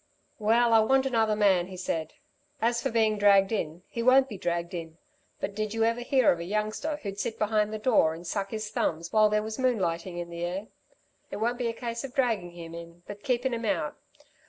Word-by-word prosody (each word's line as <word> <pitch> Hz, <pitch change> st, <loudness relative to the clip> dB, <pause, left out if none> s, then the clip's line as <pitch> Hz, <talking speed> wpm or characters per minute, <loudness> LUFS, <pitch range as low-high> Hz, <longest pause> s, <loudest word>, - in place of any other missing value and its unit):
"Well, 230 Hz, +2 st, +3 dB
I 225 Hz, -, +7 dB
want 265 Hz, +4 st, +3 dB
another 225 Hz, -4 st, +2 dB
man," 190 Hz, -4 st, +3 dB
he 185 Hz, -1 st, -9 dB
said. 165 Hz, -3 st, -3 dB, 0.4 s
"As 235 Hz, +1 st, +1 dB
for -, -, -1 dB
being 220 Hz, -2 st, +2 dB
dragged 200 Hz, -1 st, +5 dB
in, 175 Hz, -5 st, -3 dB
he 235 Hz, -, -4 dB
won't 260 Hz, +2 st, +5 dB
be 220 Hz, -, -7 dB
dragged 170 Hz, -1 st, -2 dB
in. 165 Hz, -2 st, -6 dB, 0.4 s
But 200 Hz, -, -3 dB
did 215 Hz, +1 st, -3 dB
you 225 Hz, -, +2 dB
ever 230 Hz, +1 st, +1 dB
hear 255 Hz, -1 st, +3 dB
of 170 Hz, -, -1 dB
a -, -, -4 dB
youngster 215 Hz, -, -2 dB
who'd 200 Hz, -8 st, -6 dB
sit 220 Hz, -, -3 dB
behind 215 Hz, 0 st, +1 dB
the 215 Hz, -, -3 dB
door 210 Hz, -8 st, +3 dB
and 170 Hz, +2 st, -11 dB
suck 195 Hz, +2 st, -2 dB
his 215 Hz, -1 st, -5 dB
thumbs 165 Hz, -5 st, -2 dB
while 215 Hz, -1 st, +5 dB
there 210 Hz, 0 st, +1 dB
was 220 Hz, +3 st, -5 dB
moonlighting 185 Hz, -8 st, 0 dB
in 170 Hz, 0 st, -5 dB
the 170 Hz, 0 st, -5 dB
air? 185 Hz, +4 st, -3 dB, 0.6 s
It -, -, -5 dB
won't 240 Hz, +3 st, -1 dB
be 245 Hz, -, 0 dB
a 230 Hz, -, -1 dB
case 235 Hz, 0 st, -5 dB
of 275 Hz, -2 st, -8 dB
draggin' 225 Hz, -9 st, +1 dB
him 170 Hz, -1 st, -10 dB
in, 170 Hz, +1 st, -10 dB
but 205 Hz, 0 st, -9 dB
keepin' 250 Hz, +1 st, 0 dB
him 230 Hz, 0 st, -3 dB
out. 175 Hz, -8 st, -1 dB
215 Hz, 225 wpm, -28 LUFS, 175-230 Hz, 0.6 s, I